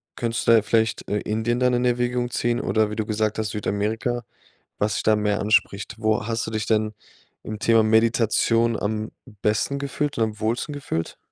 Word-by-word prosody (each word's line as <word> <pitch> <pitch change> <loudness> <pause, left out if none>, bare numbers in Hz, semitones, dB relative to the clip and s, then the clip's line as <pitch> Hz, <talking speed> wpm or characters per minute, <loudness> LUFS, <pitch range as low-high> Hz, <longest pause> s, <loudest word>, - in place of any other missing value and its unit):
könntest 115 -1 -2
du - - +7
da 115 - +6
vielleicht, 110 0 0
äh, 105 - +1
Indien 110 +3 -1
dann 125 0 +3
in 120 +1 +1
Erwägung 120 0 0
ziehen, 120 0 0
oder 110 -1 +1
wie - - -4
du 110 - -1
gesagt 110 0 -1
hast, 110 -1 -1
Südamerika, 110 +4 -2 0.6
was 105 -2 +1
dich - - -2
da 110 - +4
mehr 105 -1 0
anspricht. 105 -2 +1
Wo 110 0 0
hast 115 0 -1
du - - -4
dich 110 -1 -2
denn 110 -1 +1 0.5
im 110 -1 -6
Thema 115 0 +4
Meditation 115 +1 +2
am 110 +1 -2 0.3
besten 110 +6 +1
gefühlt 140 +1 -2
und 115 - +2
am 110 -1 -6
wohlsten 115 +7 -1
gefühlt? 110 - -4
110 Hz, 190 wpm, -23 LUFS, 110-120 Hz, 0.6 s, du